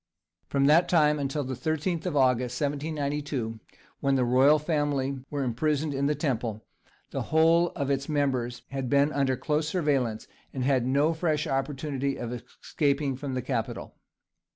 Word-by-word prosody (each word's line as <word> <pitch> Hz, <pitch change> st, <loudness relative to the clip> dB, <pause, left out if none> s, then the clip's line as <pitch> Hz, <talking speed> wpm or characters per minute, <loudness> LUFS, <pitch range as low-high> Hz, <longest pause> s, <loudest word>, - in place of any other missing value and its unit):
From 140 Hz, -1 st, +1 dB
that 155 Hz, +5 st, +5 dB
time 150 Hz, -3 st, +4 dB
until 140 Hz, +1 st, -2 dB
the 130 Hz, 0 st, -4 dB
13th 160 Hz, +6 st, -2 dB
of 155 Hz, -5 st, -1 dB
August, 125 Hz, -2 st, +2 dB
1792, 145 Hz, -5 st, -2 dB, 0.4 s
when 140 Hz, -1 st, +1 dB
the 130 Hz, -2 st, +2 dB
royal 130 Hz, +5 st, +5 dB
family 145 Hz, -3 st, -1 dB
were 145 Hz, -2 st, -2 dB
imprisoned 145 Hz, +4 st, 0 dB
in 140 Hz, +1 st, 0 dB
the 150 Hz, -, +1 dB
Temple, 120 Hz, -7 st, -2 dB, 0.5 s
the -, -, -2 dB
whole 165 Hz, +3 st, +4 dB
of 140 Hz, -3 st, -1 dB
its 140 Hz, +1 st, -1 dB
members 130 Hz, -5 st, -1 dB
had 135 Hz, -2 st, -3 dB
been 140 Hz, +1 st, +3 dB
under 135 Hz, -2 st, +1 dB
close 150 Hz, 0 st, -1 dB
surveillance, 140 Hz, -, 0 dB, 0.3 s
and 130 Hz, -, -2 dB
had 130 Hz, -2 st, +2 dB
no 145 Hz, +5 st, +2 dB
fresh 155 Hz, -2 st, 0 dB
opportunity 135 Hz, 0 st, -2 dB
of 120 Hz, 0 st, -4 dB
escaping 140 Hz, +3 st, -2 dB
from 135 Hz, 0 st, -5 dB
the 125 Hz, -, -2 dB
capital. 125 Hz, -4 st, -3 dB
140 Hz, 155 wpm, -27 LUFS, 130-150 Hz, 0.5 s, that